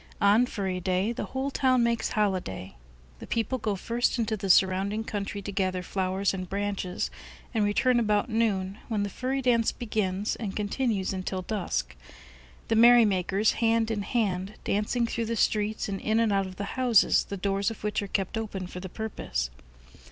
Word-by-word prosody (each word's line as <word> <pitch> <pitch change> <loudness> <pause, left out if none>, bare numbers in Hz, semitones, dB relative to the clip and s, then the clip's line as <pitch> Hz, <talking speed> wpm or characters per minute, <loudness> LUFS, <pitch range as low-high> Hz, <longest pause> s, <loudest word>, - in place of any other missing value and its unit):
On 210 +5 +5
"Furry 190 -5 -3
Day" 185 +4 0
the 235 - -4
whole 270 +1 -3
town 255 -3 +3
makes 235 -1 0
holiday. 185 - -1 0.4
The - - -9
people 230 +3 -1
go 210 -2 -1
first 235 +6 0
into 225 -2 0
the 195 -2 -4
surrounding 195 +4 +3
country 205 -2 -4
to 205 - -4
gather 185 -2 -1
flowers 190 +2 0
and 185 -2 -5
branches, 200 -2 -2 0.4
and 220 -3 +2
return 240 +4 +3
about 210 0 +1
noon, 210 -4 0
when 215 -3 0
the 205 - -3
Furry 265 +4 -2
dance 235 -3 +3
begins 210 -3 -2
and 210 -4 -5
continues 210 -2 -1
until 185 0 -3
dusk; 75 - -2 0.7
the 225 - +1
merrymakers, 215 -4 +5
hand 225 0 +2
in 210 -2 -1
hand, 200 -3 -1
dancing 210 +4 0
through 230 0 -2
the 230 - -1
streets 215 -1 0
and 195 -1 -4
in 220 +1 +1
and 225 -3 +2
out 195 -1 +1
of 185 - -9
the 200 +2 -5
houses, 245 -5 +4
the 200 - -5
doors 195 +2 0
of 225 - -9
which 210 0 0
are 200 - -4
kept 195 +3 -1
open 205 -4 -4
for 180 0 -8
the 190 0 -7
purpose. 65 - -3
205 Hz, 180 wpm, -27 LUFS, 190-225 Hz, 0.7 s, On